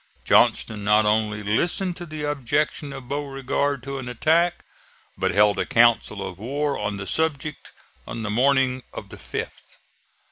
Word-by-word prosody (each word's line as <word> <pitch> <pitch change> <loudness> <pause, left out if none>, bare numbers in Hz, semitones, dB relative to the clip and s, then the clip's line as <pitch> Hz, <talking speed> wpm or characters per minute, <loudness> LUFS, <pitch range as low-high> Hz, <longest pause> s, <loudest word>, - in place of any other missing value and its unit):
Johnston 105 -2 +3
not 105 +1 +4
only 105 -1 +1
listened 175 - 0
to 175 -1 -8
the 155 -1 -6
objection 145 +1 -1
of 135 -2 -9
Beauregard 140 -1 -2
to 140 0 -5
an 125 -2 -6
attack, 165 +8 +1 0.5
but - - 0
held 105 -1 +3
a - - +1
council 115 -3 +3
of 90 - -9
war 140 +6 -1
on 105 -1 -3
the 95 - -5
subject 150 +2 -1 0.4
on 115 -1 -5
the 105 - -2
morning 130 +2 +2
of - - -7
the - - -10
5th. - - -7
130 Hz, 155 wpm, -24 LUFS, 105-145 Hz, 0.5 s, not